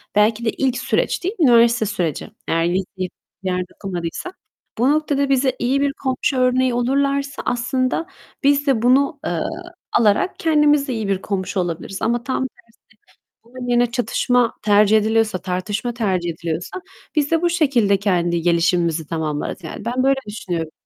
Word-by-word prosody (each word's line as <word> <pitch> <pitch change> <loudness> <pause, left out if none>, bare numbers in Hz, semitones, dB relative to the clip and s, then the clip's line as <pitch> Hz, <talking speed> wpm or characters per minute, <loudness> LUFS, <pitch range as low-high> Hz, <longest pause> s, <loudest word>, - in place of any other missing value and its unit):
belki 220 +2 +3
de - - +3
ilk 255 -2 0
süreç, 260 - 0
değil 390 +6 -2
mi? 310 - +5
Üniversite 235 -2 +5
süreci. 180 -8 -2 0.2
Eğer 165 0 +1
liseyi 185 +2 +1 0.3
başka - - -50 0.3
bir 185 - -1
yerde 180 0 -2
okumadıysak. 185 - -5 0.4
Bu 250 +5 +3
noktada 290 -2 +1
bize 265 -1 +2
iyi 265 +3 +1
bir 280 -1 +1
komşu 260 0 -1
örneği 255 0 +2
olurlarsa 275 +3 0
aslında 255 +6 -1 0.4
biz 285 +1 +3
de 245 -5 +2
bunu, 275 +4 +3
eee, - - -1 0.5
alarak 215 - +2
kendimiz 295 -3 +3
de 255 - -2
iyi 220 -3 -3
bir 195 -1 0
komşu 190 -1 -2
olabiliriz. 175 +2 -4
Ama 235 +2 0
tam 260 +1 -2
tersi, 250 - -25 0.8
bunun 245 +1 -9
yerine 240 -1 +2
çatışma 245 -1 +1
tercih 210 +1 +5
ediliyorsa, 220 -2 +1
tartışma 195 +6 -3
tercih 190 -7 -1
ediliyorsa 170 - -4 0.3
biz 295 +1 +1
de 330 - +3
bu 345 - +2
şekilde 265 - +2
kendi 175 -4 0
gelişimimizi 170 -2 +1
tamamlarız. 160 +2 -3
Yani, 170 +6 -7
ben 250 +2 0
böyle 270 0 +3
düşünüyorum. 175 -6 -4
235 Hz, 160 wpm, -20 LUFS, 185-270 Hz, 0.8 s, mi